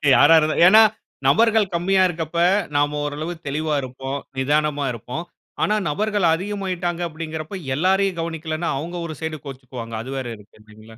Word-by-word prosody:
யார 145 - +6
இருந்தா 155 0 0
ஏன்னா, 215 +4 +8 0.5
நபர்கள் 220 -3 +4
கம்மியா 190 +2 +3
இருக்கப்ப. 160 -2 -5 0.4
நாம 145 +1 +1
ஓரளவு 150 +4 -4
தெளிவா 155 +2 -1
இருப்போம். 135 +2 -5 0.2
நிதானமா 145 +1 +1
இருப்போம். 125 +8 -6 0.4
ஆனா, 210 - +2
நபர்கள் 205 +4 0
அதிகமாகிட்டாங்க 180 -2 -3
அப்படிங்கிறப்ப, 160 +2 -6
எல்லாரையும் 190 +3 +1
கவனிக்கலன்னா 165 0 -3
அவங்க 165 +5 -5
ஒரு 155 - -6
சைட் 155 -2 -4
கோவிச்சுக்குவாங்க. 125 -4 -8
அது 130 - -7
வேற 130 - -3
இருக்கு 105 +1 -20
இல்லைங்களா? 110 +1 -16
155 Hz, 140 wpm, -22 LUFS, 140-180 Hz, 0.5 s, ஏன்னா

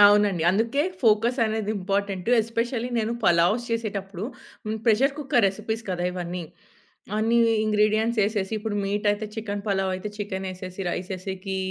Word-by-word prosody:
అవునండి. 205 -4 +6
అందుకే 230 +9 +1 0.2
ఫోకస్ 230 +3 +3
అనేది 220 -1 -1
ఇంపార్‌టెంటు 195 +2 -1
ఎస్పెషల్లీ 230 +2 -2
నేను 225 +1 0
పలావ్స్ 175 +7 +4
చేసేటప్పుడు, 200 -4 -3 0.4
హ్మ్. 220 +1 -2
ప్రెషర్ 260 +5 +4
కుక్కర్ 260 -6 +2
రెసిపీస్ 220 +3 -4
కదా! 175 -1 -1
ఇవన్నీ. 180 0 -4 0.7
అన్ని 225 +2 +3 0.3
ఇంగ్రీడియెంట్స్ 215 +2 +2
యేసేసి, 205 0 -1
ఇప్పుడు 215 -1 -3
మీటయితే 205 +1 0
చికెన్ 205 -2 -4
పలావయితే 190 0 0
చికెనేసేసి, 190 -2 -5
రైసేసేకి 190 +1 -4
205 Hz, 125 wpm, -25 LUFS, 190-225 Hz, 0.7 s, అవునండి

